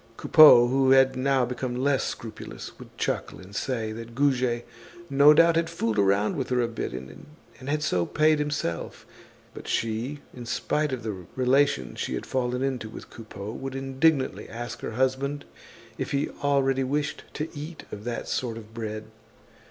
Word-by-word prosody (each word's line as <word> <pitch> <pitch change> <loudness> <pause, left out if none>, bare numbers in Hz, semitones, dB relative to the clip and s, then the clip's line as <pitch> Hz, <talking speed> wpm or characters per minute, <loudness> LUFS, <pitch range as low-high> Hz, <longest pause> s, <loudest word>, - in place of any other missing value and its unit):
Coupeau, 125 -6 +8
who 130 +1 +2
had 135 0 +5
now 130 0 +2
become 125 0 -4
less 135 +1 +1
scrupulous, 110 -2 -7
would - - -13
chuckle - - -2
and 95 +2 -12
say 115 -4 -2
that 115 +1 -8
Goujet 125 -3 +1 0.5
no 140 +2 +7
doubt 165 +2 +6
had 165 0 +1
fooled 115 -10 -1
around 100 +1 +2
with 135 -2 -3
her 125 -1 +1
a 120 - +2
bit, 115 - -4
and 130 - -11
had 150 +1 0
so 90 - +1
paid 155 0 +3
himself. 145 - -3 0.5
But - - -10
she, 115 +6 -2
in 120 -2 -9
spite 150 +4 0
of 130 -3 -4
the 95 -6 -5
relations 130 - +2
she - - -2
had - - -5
fallen 125 0 -1
into 130 -5 -2
with - - -11
Coupeau, 105 -2 -8
would 135 +3 -6
indignantly 135 +2 +1
ask 120 0 -6
her - - -5
husband 130 +3 -1 0.5
if - - -2
he 140 +1 0
already 135 -2 +2
wished 145 +3 -2
to 155 +2 -4
eat 150 +3 -7
of 105 - -7
that 120 -1 -4
sort 115 -3 -2
of 110 -1 -11
bread. 110 -2 -5
130 Hz, 170 wpm, -26 LUFS, 115-140 Hz, 0.5 s, Coupeau